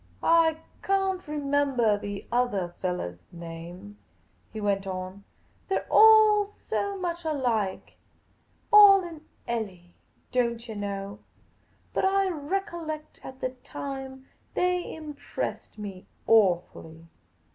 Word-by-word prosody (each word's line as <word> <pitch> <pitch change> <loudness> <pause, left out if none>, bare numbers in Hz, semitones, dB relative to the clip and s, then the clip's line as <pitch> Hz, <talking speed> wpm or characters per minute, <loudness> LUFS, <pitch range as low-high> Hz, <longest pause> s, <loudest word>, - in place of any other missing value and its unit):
" 90 - -30
I 330 -1 +4 0.2
can't 385 -1 0
remembah 280 -7 +1
the 205 -1 -6
othah 230 -8 0
fellahs' 90 - -4
names," 170 +4 -9 0.5
he 220 - -6
went 200 -2 0
on; 185 +1 -6 0.4
they 385 - +1
're - - -2
all 435 -1 +7
so 400 -1 -3
much 345 -2 -3
alike; 245 -11 -1 0.8
all 400 -2 +9
in 330 -3 -8 0.3
clli, 195 -7 -4 0.4
don't 235 -1 0
yah 225 - -6
know; 200 -1 -5 0.7
but - - 0
I 390 0 +3
recollect 325 -1 -4
at 260 0 -10
the 255 - 0
time 265 +1 -8 0.3
they 360 0 0
impressed 300 -7 -6
me 195 -3 -8 0.2
awfully." 175 -6 +2
250 Hz, 115 wpm, -27 LUFS, -, 0.8 s, all